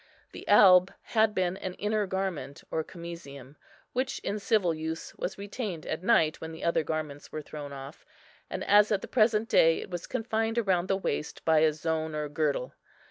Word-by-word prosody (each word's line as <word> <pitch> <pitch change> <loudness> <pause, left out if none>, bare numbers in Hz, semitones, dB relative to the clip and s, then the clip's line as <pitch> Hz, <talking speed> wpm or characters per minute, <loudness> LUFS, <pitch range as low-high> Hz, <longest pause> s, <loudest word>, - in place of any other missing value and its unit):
The - - -10
alb 185 -2 +7
had 220 -2 +2
been 185 -1 +1
the 185 - -4
inner 210 0 -1
garment, 190 -7 -3
or 160 - 0
camisium, 155 -6 -10 0.4
which 260 +1 -1
in 210 - -2
civil 195 -4 +2
use 160 +1 -5
was 185 - -4
retained 200 -4 -5
at 160 - -3
night 165 -6 +3
when 160 - -6
the 160 - -9
other 170 -1 +2
garments 155 -2 -5
were 155 - -5
thrown 145 -1 -8
off; 140 +2 -9 0.5
and, - - -4
as 210 +1 +5
at 205 - +1
the - - -5
present 220 -2 +3
day, 165 -6 +4
it - - -8
was 175 -1 -5
confined 225 0 -1
round 185 -2 +1
the 195 - +1
waist 150 -5 -4
by 160 -1 +5
a 155 0 +4
zone 160 0 -2
or 150 -1 -3
girdle. 145 -4 -1
170 Hz, 190 wpm, -29 LUFS, 155-205 Hz, 0.5 s, alb